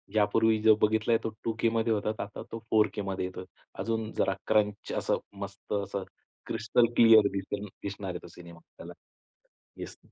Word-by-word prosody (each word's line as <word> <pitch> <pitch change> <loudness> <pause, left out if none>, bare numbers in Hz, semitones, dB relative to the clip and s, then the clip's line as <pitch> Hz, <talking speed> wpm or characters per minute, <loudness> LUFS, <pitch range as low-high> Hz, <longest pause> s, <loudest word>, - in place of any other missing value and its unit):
यापूर्वी 110 +1 +3
जो 110 -1 +6
बघितलाय 110 +2 +3
तो 115 - -1
2 115 - 0
केमध्ये 115 0 +2
होता 105 0 -1
आता 100 - -8
तो 115 - -5
फोर 110 -1 +5
केमध्ये 95 -2 -3
येतो. 90 0 -6 0.4
अजून 110 -1 -2
जरा 95 - +2
क्रंच, 105 -1 +1
असं - - +1 0.3
मस्त 100 +1 -7
असं, 100 -1 -2 0.4
क्रिस्टल 115 +1 +2
क्लिअर 110 -3 +7
दिसेल 100 +2 -4 0.2
दिसणार 100 -1 -5
आहे 90 - -5
तो - - -10
सिनेमा. 85 -1 -13 0.2
त्याला. - - -9 0.8
येस. - - -8
105 Hz, 160 wpm, -29 LUFS, 100-110 Hz, 0.8 s, क्लिअर